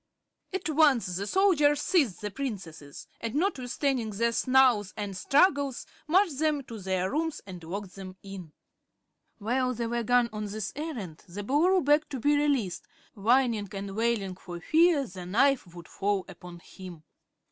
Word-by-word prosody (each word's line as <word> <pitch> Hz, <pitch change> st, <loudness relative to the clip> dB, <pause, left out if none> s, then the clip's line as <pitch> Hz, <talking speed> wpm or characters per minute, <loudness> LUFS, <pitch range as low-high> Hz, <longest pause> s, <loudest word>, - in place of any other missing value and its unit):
At 380 Hz, -2 st, -3 dB
once 280 Hz, -, +3 dB
the 200 Hz, +1 st, -3 dB
soldiers 300 Hz, -, +3 dB
seized 285 Hz, -, +1 dB
the 210 Hz, -1 st, -4 dB
Princesses 190 Hz, -, -7 dB
and, 230 Hz, +1 st, -4 dB
notwithstanding 270 Hz, -, -1 dB
their 230 Hz, +3 st, 0 dB
snarls 250 Hz, -5 st, +3 dB
and 205 Hz, -2 st, -4 dB
struggles, 280 Hz, -, +2 dB, 0.2 s
marched 340 Hz, -3 st, +2 dB
them 305 Hz, -2 st, +1 dB
to 230 Hz, -3 st, -9 dB
their 190 Hz, -1 st, -1 dB
rooms 320 Hz, +1 st, -1 dB
and 180 Hz, -3 st, -9 dB
locked 190 Hz, +3 st, -6 dB
them 185 Hz, -1 st, -9 dB
in. 195 Hz, -5 st, -9 dB, 0.9 s
While 255 Hz, +4 st, 0 dB
they 235 Hz, +1 st, -2 dB
were 235 Hz, +1 st, -1 dB
gone 245 Hz, +1 st, +3 dB
on 215 Hz, 0 st, -4 dB
this 210 Hz, 0 st, -5 dB
errand 245 Hz, -, -6 dB
the 205 Hz, +4 st, -6 dB
Boolooroo 330 Hz, -, +2 dB
begged 295 Hz, +1 st, +3 dB
to 270 Hz, -, -5 dB
be 290 Hz, +5 st, +3 dB
released, 280 Hz, -10 st, 0 dB, 0.3 s
whining 230 Hz, 0 st, +2 dB
and 195 Hz, 0 st, -5 dB
wailing 220 Hz, -4 st, 0 dB
for 175 Hz, -1 st, -9 dB
fear 320 Hz, -, +3 dB
the 180 Hz, -4 st, -9 dB
knife 240 Hz, -1 st, +2 dB
would 170 Hz, -2 st, -10 dB
fall 200 Hz, -1 st, -1 dB
upon 180 Hz, -2 st, -11 dB
him. 180 Hz, -4 st, -11 dB
230 Hz, 160 wpm, -28 LUFS, 195-285 Hz, 0.9 s, once